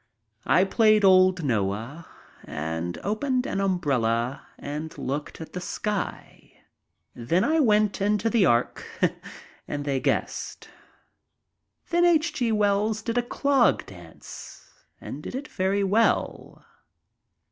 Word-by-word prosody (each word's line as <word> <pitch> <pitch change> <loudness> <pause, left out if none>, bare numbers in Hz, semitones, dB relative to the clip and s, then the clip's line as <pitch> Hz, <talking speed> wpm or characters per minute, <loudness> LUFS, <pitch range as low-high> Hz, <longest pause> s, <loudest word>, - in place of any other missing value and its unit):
I 185 - +5
played 215 +1 +3
old 185 -2 +5
Noah 115 +6 -2 0.4
and 80 +3 -4
opened 250 +5 -1
an 195 - -2
umbrella 135 -9 0
and 150 +2 -6
looked 145 +3 -4
at 160 - -9
the 180 - -5
sky. 205 +2 -5 0.5
Then 165 - 0
I 315 +6 +2
went 210 -7 +2
into 210 +2 +1
the 225 -2 +3
ark 120 -7 +1 0.8
and 145 0 -4
they 140 -2 0
guessed. - - -3 1.2
Then 345 0 +3
H. 335 -2 +3
G. 240 -3 0
Wells 210 0 +1
did 230 +1 0
a - - +2
clog 270 +1 +2
dance, 85 -4 -12 0.3
and 145 - -8
did 245 - -7
it 285 +3 -5
very 195 -2 0
well. 210 +4 0
190 Hz, 120 wpm, -25 LUFS, 140-220 Hz, 1.2 s, I